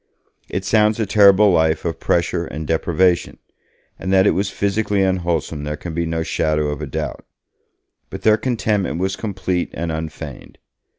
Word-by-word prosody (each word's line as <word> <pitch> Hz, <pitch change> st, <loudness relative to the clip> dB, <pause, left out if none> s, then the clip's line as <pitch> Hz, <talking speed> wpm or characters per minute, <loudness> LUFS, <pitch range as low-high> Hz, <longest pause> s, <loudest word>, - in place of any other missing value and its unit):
It 95 Hz, +1 st, -3 dB
sounds 105 Hz, +1 st, +3 dB
a 110 Hz, -, +1 dB
terrible 100 Hz, 0 st, +6 dB
life 80 Hz, -2 st, +2 dB
of 80 Hz, -2 st, -3 dB
pressure 85 Hz, 0 st, 0 dB
and 80 Hz, +1 st, -6 dB
deprivation, 85 Hz, +3 st, +1 dB, 0.6 s
and 95 Hz, -, -3 dB
that 95 Hz, 0 st, +5 dB
it -, -, +5 dB
was 95 Hz, +1 st, -1 dB
physically 100 Hz, 0 st, 0 dB
unwholesome 85 Hz, -5 st, -1 dB
there 75 Hz, 0 st, -4 dB
can 85 Hz, 0 st, -7 dB
be 85 Hz, +1 st, -1 dB
no 80 Hz, 0 st, -1 dB
shadow 75 Hz, -2 st, 0 dB
of 75 Hz, -1 st, -4 dB
a -, -, -4 dB
doubt. -, -, -4 dB, 0.9 s
But -, -, -8 dB
their 110 Hz, 0 st, +5 dB
contentment 110 Hz, -8 st, -1 dB
was 95 Hz, +2 st, -1 dB
complete 95 Hz, -4 st, -2 dB
and 85 Hz, 0 st, -3 dB
unfeigned. 80 Hz, -1 st, -7 dB
90 Hz, 165 wpm, -20 LUFS, 80-100 Hz, 0.9 s, terrible